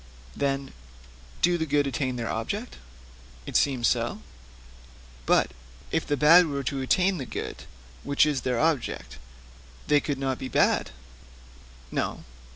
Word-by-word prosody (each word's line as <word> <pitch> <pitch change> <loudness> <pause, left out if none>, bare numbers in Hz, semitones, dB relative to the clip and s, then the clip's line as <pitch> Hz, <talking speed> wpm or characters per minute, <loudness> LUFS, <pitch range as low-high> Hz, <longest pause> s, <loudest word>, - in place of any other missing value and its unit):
'Then, 135 -1 -2 0.7
do 175 0 +3
the 160 - 0
good 145 0 +2
attain 135 -2 -2
their 120 -2 -3
object?' 205 - -4 0.7
'It - - -8
seems 130 -4 +3
so.' 115 - -1 1.0
'But - - +3 0.4
if - - -1
the 145 - 0
bad 165 +4 +7
were 140 -2 -3
to 135 +1 -2
attain 185 +7 +2
the 135 - -4
good - - -6 0.4
which 140 +1 +3
is 145 -4 0
their 125 -2 -1
object, 115 - -1 0.7
they 150 - +4
could 145 -1 -3
not 135 -1 -2
be 130 - -4
bad?' - - +2 1.0
'No.' - - -2
140 Hz, 140 wpm, -26 LUFS, 125-150 Hz, 1.0 s, bad